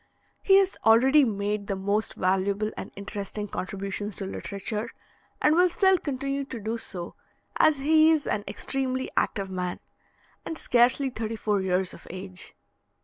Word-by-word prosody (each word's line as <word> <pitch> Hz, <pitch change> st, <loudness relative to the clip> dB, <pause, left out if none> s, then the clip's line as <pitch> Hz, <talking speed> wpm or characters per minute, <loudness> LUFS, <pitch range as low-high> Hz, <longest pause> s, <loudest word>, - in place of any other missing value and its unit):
He 385 Hz, -, +5 dB
has 390 Hz, -1 st, +3 dB
already 260 Hz, +7 st, +6 dB
made 205 Hz, -3 st, -1 dB
the 195 Hz, -, -1 dB
most 200 Hz, +2 st, -1 dB
valuable 195 Hz, +3 st, 0 dB
and -, -, -7 dB
interesting 200 Hz, +1 st, -5 dB
contributions 195 Hz, +1 st, -4 dB
to 195 Hz, -, -4 dB
literature, 210 Hz, +3 st, -4 dB, 0.5 s
and 300 Hz, -, +4 dB
will 360 Hz, +2 st, +5 dB
still 380 Hz, +1 st, +3 dB
continue 275 Hz, -1 st, -2 dB
to 260 Hz, -3 st, -7 dB
do 220 Hz, +2 st, -3 dB
so, 175 Hz, -5 st, -5 dB, 0.5 s
as 310 Hz, -2 st, +5 dB
he 310 Hz, +3 st, +5 dB
is 310 Hz, -3 st, +1 dB
an 205 Hz, -, -1 dB
extremely 260 Hz, -1 st, -2 dB
active 195 Hz, -2 st, 0 dB
man, 180 Hz, -1 st, -3 dB, 0.6 s
and 325 Hz, -, -5 dB
scarcely 255 Hz, +2 st, +3 dB
thirty 225 Hz, -1 st, -4 dB
four 210 Hz, -2 st, 0 dB
years 185 Hz, 0 st, 0 dB
of -, -, -13 dB
age. 185 Hz, 0 st, -8 dB
215 Hz, 150 wpm, -26 LUFS, 195-270 Hz, 0.6 s, already